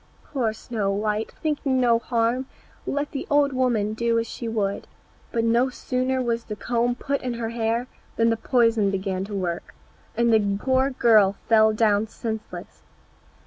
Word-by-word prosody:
Poor 245 -6 +1
Snow 215 -2 -3
white, 210 +2 -1
thinking 285 -4 0
no 235 -2 +4
harm, 235 +2 0 0.4
let 285 +1 -2
the 275 - -5
old 285 -1 +3
woman 235 -5 +1
do 230 +1 0
as 230 - 0
she 230 +1 -6
would, 205 -3 -2 0.4
but 230 - 0
no 235 +3 +3
sooner 255 +1 -1
was 235 -1 -1
the 210 - -5
comb 240 +3 0
put 280 +2 -2
in 250 -2 -3
her 230 -1 -3
hair 230 +1 -1 0.3
than 230 0 +3
the - - +2
poison 230 -3 +2
began 190 -1 -2
to 205 0 -6
work, 175 -3 -4 0.4
and 235 -1 +3
the 200 -2 +2
poor 260 +3 +2
girl 220 -6 +4
fell 220 -1 +5
down 215 -1 +2
senseless. 220 -1 -7
230 Hz, 165 wpm, -24 LUFS, 215-250 Hz, 0.4 s, fell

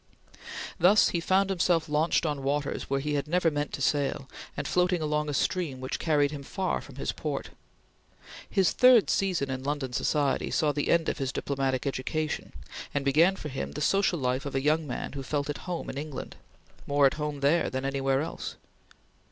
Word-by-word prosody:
Thus 195 +5 +6
he 170 - -1
found 190 +3 +2
himself 175 -3 +2
launched 155 +3 +1
on 145 -3 -1
waters 140 +1 -2
where 140 0 +1
he 150 +2 -2
had 145 0 -1
never 170 0 +2
meant 145 0 -2
to 140 - -3
sail, 145 -1 0 0.3
and - - -2
floating 180 0 +2
along 150 -1 -1
a - - -2
stream 160 -7 -1
which 130 0 -4
carried 145 -3 +2
him 145 -2 -6
far 185 +7 -2
from - - -13
his - - -2
port. - - -4 1.0
His 190 -3 +3
third 250 -4 +6
season 175 -9 0
in 130 0 -3
London 140 -2 -3
society 140 +3 +1
saw 155 -3 +2
the 145 0 -2
end 170 -1 +3
of - - -1
his 135 -1 -1
diplomatic 135 -3 -1
education, 150 +3 -2 0.4
and 140 -1 0
began 165 +7 +4
for 155 - -6
him 135 -1 -4
the - - -5
social 195 +2 +2
life 130 0 -1
of 140 - -6
a 135 - 0
young 155 +1 +2
man 125 - -4
who 140 - -4
felt 145 +2 -2
at 145 - -6
home 175 -2 -3
in 135 - -4
England 150 -2 -6 0.5
more 145 0 +4
at 135 - +4
home 150 -2 -3
there 150 +5 +3
than 130 +1 -3
anywhere 135 0 +1
else. 160 - -5
150 Hz, 195 wpm, -28 LUFS, 135-165 Hz, 1.0 s, Thus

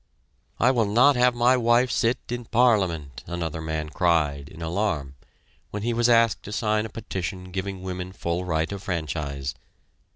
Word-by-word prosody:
"I 125 - +5
will 115 -5 +1
not 125 +7 +5
have 125 0 +3
my 120 +2 +4
wife 120 +1 +3
sit 115 +2 +2
in 120 0 -4
Parliament," 95 - +1
another 80 -2 -4
man 80 -1 -3
cried 75 -5 +1
in 80 - -13
alarm, 80 -5 -2 0.6
when 105 0 -5
he 120 +1 0
was 120 +1 +2
asked 115 -2 +4
to 105 - -9
sign 105 +1 0
a - - -15
petition 95 -4 -5
giving 95 0 -4
women 90 0 -5
full 85 -1 -3
right 80 -1 -1
of 100 -1 -5
franchise. 75 -6 -3
95 Hz, 165 wpm, -25 LUFS, 80-115 Hz, 0.6 s, I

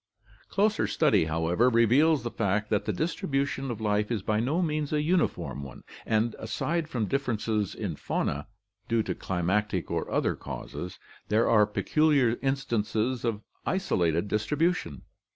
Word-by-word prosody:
Closer 205 - +2
study, 105 -5 +3
however, 85 +9 +2
reveals 125 +5 +4
the 120 - -3
fact 105 0 -1
that 105 - +1
the 105 - 0
distribution 135 - -1
of 120 - -4
life 105 -1 0
is 110 -5 -2
by 105 +1 +1
no 135 +9 0
means 155 -4 -1
a 150 -1 +1
uniform 165 - 0
one, 70 -2 -10 0.2
and, 110 +1 +1
aside 150 +9 -2
from 120 -7 -1
differences 110 -5 -1
in - - -3
faunae, 75 +1 -2 0.4
due 115 -1 +2
to - - -2
climatic 95 +1 -1
or - - -2
other - - +1
causes, 90 - -7 0.3
there 110 +2 +3
are 105 -3 +5
peculiar 140 +2 +2
instances 125 -3 -1
of 115 -3 -1 0.2
isolated 90 - 0
distribution. 105 - 0
115 Hz, 145 wpm, -28 LUFS, 105-140 Hz, 0.4 s, are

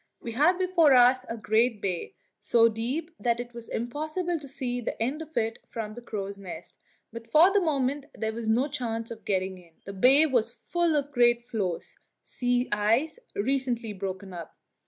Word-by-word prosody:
We 235 - -6
had 305 +10 +3
before 360 -6 +4
us 250 +1 +5
a 230 - -4
great 220 +2 +2
bay, 185 - -3 0.2
so 230 -1 +4
deep 255 +10 -3
that 235 -1 +1
it 245 0 -6
was 235 -1 -10
impossible 310 +8 -2
to 285 - -10
see 255 -2 -3
the - - -4
end 265 +8 -1
of 315 0 -9
it 225 0 0
from 215 -2 -5
the 240 - -9
crow's 200 -3 -5
nest; 190 -3 -9 0.3
but 230 0 -9
for 345 +5 +6
the 405 - +4
moment 280 -3 0
there 220 0 -2
was 230 0 -5
no 240 +6 +3
chance 230 -5 -3
of 225 -1 -9
getting 190 -1 -1
in. 170 -2 -20
The 200 - -7
bay 265 +10 +6
was 250 -7 +1
full 345 -2 -1
of 285 -1 -1
great 240 -2 +3
floes 190 -7 -3 0.2
sea 245 0 0
ice 225 - +1 0.2
recently 240 -1 -1
broken 190 -1 -6
up. 170 -2 -9
240 Hz, 185 wpm, -27 LUFS, 220-285 Hz, 0.3 s, for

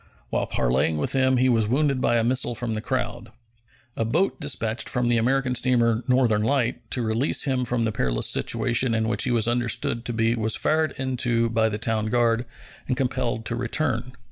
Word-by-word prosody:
While - - -1
parleying 65 +6 0
with 75 - -2
them 130 -1 +2
he 130 +1 +3
was 115 -4 +2
wounded 135 +2 +1
by 120 - +2
a 115 - +1
missile 125 0 0
from 115 0 -3
the 110 - -3
crowd. 120 -2 -3 0.7
A - - -1
boat 160 - 0
dispatched 115 -5 -1
from 125 -1 0
the 120 -1 +2
American 130 +2 +1
steamer 120 -2 +2
Northern 125 -5 +2
Light 125 +1 -1
to 125 - 0
release 115 +5 +1
him 130 -3 0
from 120 -1 -1
the 110 - 0
perilous 60 - 0
situation 120 +1 +1
in 110 0 0
which 120 - +1
he - - 0
was 115 -2 +2
understood 120 -1 0
to - - -2
be 115 0 +1
was 110 -2 0
fired 155 0 0
into 120 -3 0
by 110 -1 +2
the 105 - -3
town 110 -1 -1
guard 120 +1 +1 0.4
and 125 - -1
compelled 125 -4 -2
to 115 - -3
return. 125 0 -2
120 Hz, 195 wpm, -24 LUFS, 115-130 Hz, 0.7 s, he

